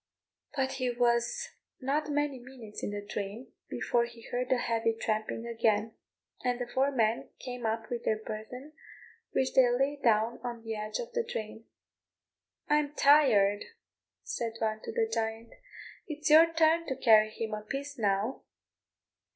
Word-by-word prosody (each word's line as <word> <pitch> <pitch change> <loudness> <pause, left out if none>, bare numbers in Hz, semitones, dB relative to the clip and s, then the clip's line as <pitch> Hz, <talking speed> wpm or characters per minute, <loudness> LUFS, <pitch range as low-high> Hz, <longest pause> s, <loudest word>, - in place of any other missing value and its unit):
But 265 -2 0
he 255 -2 0
was 240 - +1 0.3
not 290 +3 -1
many 290 -2 0
minutes 245 -4 -10
in - - -2
the 205 0 -5
drain 205 +4 -5 0.2
before 235 -1 +1
he 235 -1 -12
heard 250 +1 -1
the 255 - +3
heavy 230 -1 0
tramping 220 +1 -2
again, 225 -2 +1 0.5
and 250 -1 0
the 245 - -2
four 260 +3 +1
men 230 -4 0
came 245 -2 -5
up 220 0 -2
with 240 -1 -3
their 215 - +1
burthen, 220 +7 -8 0.6
which 260 - 0
they 255 -2 +6
laid 270 +4 0
down 225 -1 +2
on 240 -2 -5
the 225 -1 -4
edge 215 0 -3
of 480 0 -6
the 475 -1 +1
drain. 220 - -6 1.0
"I'm 295 0 +1
tired," 215 -10 +5 0.6
said 230 -1 -3
one, 220 -1 -1
to - - -4
the 455 -1 +1
giant; 225 - -3 0.5
"it's 305 0 -2
your 325 +2 +8
turn 330 +1 +3
to 265 - -1
carry 220 -4 +5
him 220 0 -5
a 210 - -3
piece 275 +4 -5
now." 205 +4 0
240 Hz, 160 wpm, -30 LUFS, 220-275 Hz, 1.0 s, your